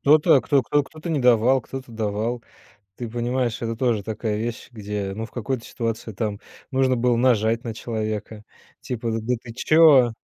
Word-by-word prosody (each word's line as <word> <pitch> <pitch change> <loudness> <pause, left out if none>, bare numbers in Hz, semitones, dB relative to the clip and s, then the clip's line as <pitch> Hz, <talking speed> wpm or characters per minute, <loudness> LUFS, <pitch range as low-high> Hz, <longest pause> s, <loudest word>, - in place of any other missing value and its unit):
кто-то, 150 0 +5
кто 140 -3 +2
кто 145 +2 +1
кто-то 155 +4 -10
не 150 - +1
давал, 125 +2 +4
кто-то 130 -1 -8
давал. 110 +2 -2 0.5
Ты 120 -2 -6
понимаешь, 120 0 -1
это 115 -1 -2
тоже 115 -4 0
такая 110 0 -3
вещь, 115 +2 -4
где, 105 -3 -4
ну, 110 - -4
в - - -15
какой-то 120 +1 -3
ситуации 115 -1 -4
там 105 0 -3 0.3
нужно 130 -1 +2
было 120 0 +2
нажать 115 -1 +2
на 115 -2 -4
человека, 110 -1 -4 0.4
типа: 120 -2 -3
"Да 115 +3 -1
ты 115 -2 -10
чё?" 140 -4 +5
120 Hz, 170 wpm, -23 LUFS, 110-130 Hz, 0.5 s, кто-то